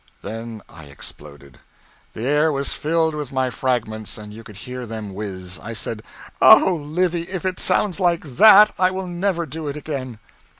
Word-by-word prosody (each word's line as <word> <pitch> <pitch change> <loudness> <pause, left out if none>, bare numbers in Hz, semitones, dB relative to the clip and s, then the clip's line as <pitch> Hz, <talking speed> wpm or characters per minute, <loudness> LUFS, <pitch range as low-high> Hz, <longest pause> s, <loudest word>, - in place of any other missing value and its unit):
Then 115 -1 -7
I 80 -1 -13
exploded; 70 0 -11 0.5
the 110 - -6
air 150 +3 +3
was 140 -1 -2
filled 160 +1 0
with 150 -3 -5
my 130 -1 0
fragments, 110 -4 -2
and 105 -1 -10
you 115 +1 -11
could 105 -3 -12
hear 125 +1 -7
them 110 -3 -6
whiz. 95 -3 -6
I 115 - -6
said, 110 0 -4 0.4
"Oh 190 - +8
Livy, 170 +2 -1
if 185 -1 -5
it 185 -1 -2
sounds 205 -3 +1
like 175 -2 +1
that 210 - +7
I 185 0 +4
will 190 0 -4
never 175 -1 -1
do 160 -1 -6
it 145 +1 -4
again!" 135 -6 -5
135 Hz, 175 wpm, -21 LUFS, 110-170 Hz, 0.5 s, Oh